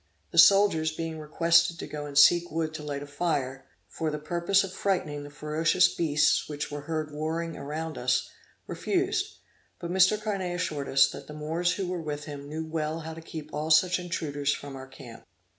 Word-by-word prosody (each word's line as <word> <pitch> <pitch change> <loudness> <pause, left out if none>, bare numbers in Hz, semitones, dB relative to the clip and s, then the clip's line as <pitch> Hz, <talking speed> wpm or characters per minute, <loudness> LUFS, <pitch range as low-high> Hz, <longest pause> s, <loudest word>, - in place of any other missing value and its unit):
The - - +3
soldiers, 195 -6 +6
being 160 0 -5
requested 170 +2 +3
to - - -6
go 150 -1 -6
and 140 -1 -5
seek 175 +4 +6
wood 160 0 -2
to 155 - -6
light 145 -1 -4
a - - -7
fire, 140 -3 -2 0.2
for 155 +10 -3
the 150 - -3
purpose 170 +6 +1
of 190 -1 -6
frightening 155 -8 -1
the 145 - -9
ferocious 155 +4 +2
beasts 150 -2 +2
which 150 0 -4
were 145 0 -5
heard 155 -2 -2
roaring 160 +2 -3
around 155 +3 -5
us, 125 0 +1 0.4
refused; - - -1 0.4
but 170 - -6
Mr. 190 +3 +4
Carnet 195 -5 -2
assured 155 -6 -3
us, 135 0 +6
that - - -9
the 150 - -9
Moors 165 +4 0
who 195 - -3
were 180 -1 -3
with 150 -2 -4
him 145 -1 -8
knew 160 +1 -4
well 160 0 -3
how 160 0 -6
to 165 - -9
keep 155 -2 -9
all 155 +1 -3
such 175 +3 +4
intruders 145 -5 -2
from 140 -1 -5
our 130 0 -9
camp. 130 -3 -12
155 Hz, 195 wpm, -28 LUFS, 145-170 Hz, 0.4 s, soldiers